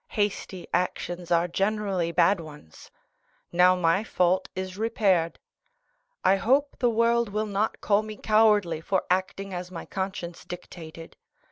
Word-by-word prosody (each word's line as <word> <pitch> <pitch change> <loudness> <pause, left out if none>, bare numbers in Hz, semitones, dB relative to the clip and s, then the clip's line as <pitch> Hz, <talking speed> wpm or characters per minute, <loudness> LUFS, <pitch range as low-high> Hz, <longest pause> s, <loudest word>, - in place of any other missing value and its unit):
Hasty 200 -3 -2
actions 175 0 -2
are 170 0 +3
generally 195 -2 -1
bad 175 +3 +3
ones. 150 - -12 0.6
Now 180 +1 +5
my 180 +3 +2
fault 185 -3 +1
is 185 0 -4
repaired. 195 -6 +1 0.9
I 195 - +4
hope 275 +8 +2
the 245 - +3
world 230 0 +2
will 210 +2 -1
not 210 +1 -2
call 205 0 +3
me 215 -1 -8
cowardly 210 -7 +3
for 190 +2 0
acting 190 +1 -1
as 180 0 -5
my 175 -2 -7
conscience 190 -3 -5
dictated. 165 -2 -10
190 Hz, 135 wpm, -26 LUFS, 175-210 Hz, 0.9 s, Now